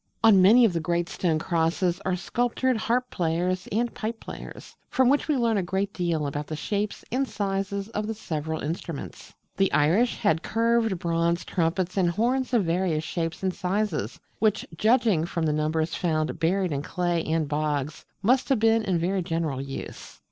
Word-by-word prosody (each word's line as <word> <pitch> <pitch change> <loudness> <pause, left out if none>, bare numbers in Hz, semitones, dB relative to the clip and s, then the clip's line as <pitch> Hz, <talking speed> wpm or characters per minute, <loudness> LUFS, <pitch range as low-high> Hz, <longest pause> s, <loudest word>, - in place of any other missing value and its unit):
On 210 -4 +7
many 230 +6 +7
of 205 - +2
the 170 - 0
great 170 +1 -1
stone 165 -4 0
crosses 170 +2 0
are 185 - +1
sculptured 245 +6 0
harp 240 +3 0
players 180 +2 -1
and 235 +3 0
pipe 225 +1 -4
players, - - -10
from 260 -1 +3
which 285 +2 +2
we 300 -3 +2
learn 230 -3 +2
a - - +2
great 195 +2 -2
deal 170 -4 -1
about 145 +1 -3
the 155 - -4
shapes 205 +5 -3
and 265 +3 0
sizes 195 -1 -2
of 210 -2 -3
the 225 - -3
several 160 -5 -4
instruments. 150 - -6 0.3
The 195 0 +2
Irish 180 +12 +3
had 165 -8 +1
curved 230 -2 +1
bronze 170 0 0
Trumpets 180 +2 -1
and 180 -3 +3
Horns 250 +8 0
of 230 -7 +2
various 165 -2 0
shapes 165 +2 -3
and 190 -1 +1
sizes, 185 - -2 0.2
which, 215 -1 +1
judging 215 -4 +3
from 170 -1 -2
the 150 - +1
numbers 155 +2 0
found 155 -3 -1
buried 185 +2 +1
in 140 -1 -1
clay 175 +2 -1
and 160 -1 0
bogs, 150 0 -2 0.2
must 255 +7 +3
have 270 - +4
been 225 +1 +4
in 190 -5 0
very 185 +3 0
general 165 -5 -2
use. 135 0 -8
180 Hz, 180 wpm, -26 LUFS, 160-220 Hz, 0.3 s, On